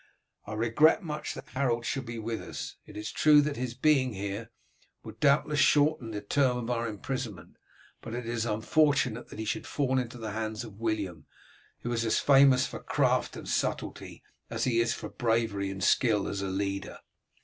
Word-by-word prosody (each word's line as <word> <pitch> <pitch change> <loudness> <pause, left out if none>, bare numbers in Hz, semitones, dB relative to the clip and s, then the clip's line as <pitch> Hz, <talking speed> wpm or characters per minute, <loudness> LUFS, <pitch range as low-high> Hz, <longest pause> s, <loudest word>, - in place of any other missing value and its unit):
I 105 - -5
regret 115 - +3
much 150 -2 -4
that - - -10
Harold 120 -2 0
should 135 -1 -2
be 120 0 -5
with 115 0 -3
us. - - -7
It - - -11
is 105 +1 -4
true 150 -1 +6
that 145 0 -1
his 125 -1 -4
being 130 -2 +3
here 100 +3 -5 0.5
will 110 - -8
doubtless 145 +1 +3
shorten 145 -3 +3
the 105 -2 -4
term 125 +4 +2
of 120 0 -3
our 120 -1 -1
imprisonment, 110 -3 -5 0.4
but 115 0 -6
it 120 -1 -4
is 115 -1 -2
unfortunate 125 +2 +1
that - - -10
he 110 - -4
should 160 +9 -3
fall 130 -2 +1
into 125 -1 -5
the 110 -2 -5
hands 110 +1 -3
of 110 -3 -11
William, 105 -7 -3 0.5
who 120 - -3
is 115 -1 0
as 115 - +2
famous 135 -2 +5
for - - -6
craft - - +1
and - - -8
subtlety - - -3 0.3
as - - -2
he 120 -3 +2
is 115 0 +2
for - - -4
bravery 110 -4 0
and 95 -1 -5
skill 110 -5 +3
as 100 - -3
a 100 - -2
leader." 95 0 -3
115 Hz, 190 wpm, -29 LUFS, 110-135 Hz, 0.5 s, true